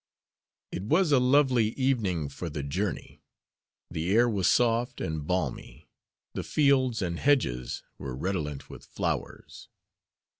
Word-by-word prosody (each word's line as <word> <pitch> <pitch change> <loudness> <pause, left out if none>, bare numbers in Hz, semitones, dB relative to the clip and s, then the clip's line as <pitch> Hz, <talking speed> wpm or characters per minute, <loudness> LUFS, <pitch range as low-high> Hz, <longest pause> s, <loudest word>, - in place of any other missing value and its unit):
It - - -4
was 155 - +2
a 140 - +6
lovely 125 -4 +3
evening 110 - 0
for 80 +5 -6
the 75 -2 -5
journey. 90 +8 -4 0.7
The 85 +2 -2
air 120 +2 +5
was 100 -6 +1
soft 120 +1 +2
and 80 -2 -4
balmy. 80 -5 -3 0.4
The - - -3
fields 130 -7 +2
and 85 -2 -3
hedges 85 - +1 0.2
were 65 -2 -5
redolent 75 -3 -3
with - - -11
flowers. - - -5
100 Hz, 125 wpm, -28 LUFS, 80-125 Hz, 0.7 s, a